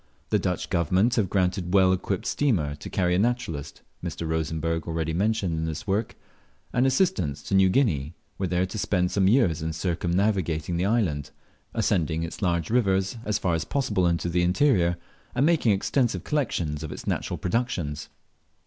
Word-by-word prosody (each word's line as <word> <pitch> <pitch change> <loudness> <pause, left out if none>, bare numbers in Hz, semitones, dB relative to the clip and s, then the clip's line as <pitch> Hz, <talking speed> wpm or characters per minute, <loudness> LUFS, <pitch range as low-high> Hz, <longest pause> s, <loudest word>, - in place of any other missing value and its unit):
The - - +3
Dutch - - -2
Government 90 +8 +2
have 100 -5 +2
granted 90 -1 0
well 95 -1 +5
equipped 95 +3 -2
steamer 105 - +1
to 75 - -9
carry 90 -3 +1
a 90 - +2
naturalist 105 - -2 0.2
(Mr. 85 - -4
Rosenberg, 80 +1 -2
already 80 -1 -2
mentioned 100 -1 0
in 80 0 -1
this 80 +2 -4
work) 105 +2 -1 0.6
and 125 +1 +3
assistants 130 - +1
to - - -5
New 95 -1 +5
Guinea, 85 - +1 0.2
where 95 - -1
they 90 - 0
are 90 - +3
to 95 +3 -6
spend 90 -2 +1
some 95 -2 +2
years 95 - +3
in 80 0 -2
circumnavigating 85 -1 0
the 90 - 0
island, 95 - 0 0.5
ascending 80 -1 +1
its 85 - -6
large 85 -2 0
rivers 95 -3 +1
a< 105 - -1
far 90 -3 0
as 80 -1 0
possible 120 -10 0
into 85 0 0
the 85 +1 +1
interior, 90 -2 +3 0.4
and 135 - +3
making 160 -9 +3
extensive 120 +5 0
collections 85 - -1
of 80 - -5
its - - -8
natural - - -2
productions. 90 -9 -2
90 Hz, 175 wpm, -26 LUFS, 80-105 Hz, 0.6 s, well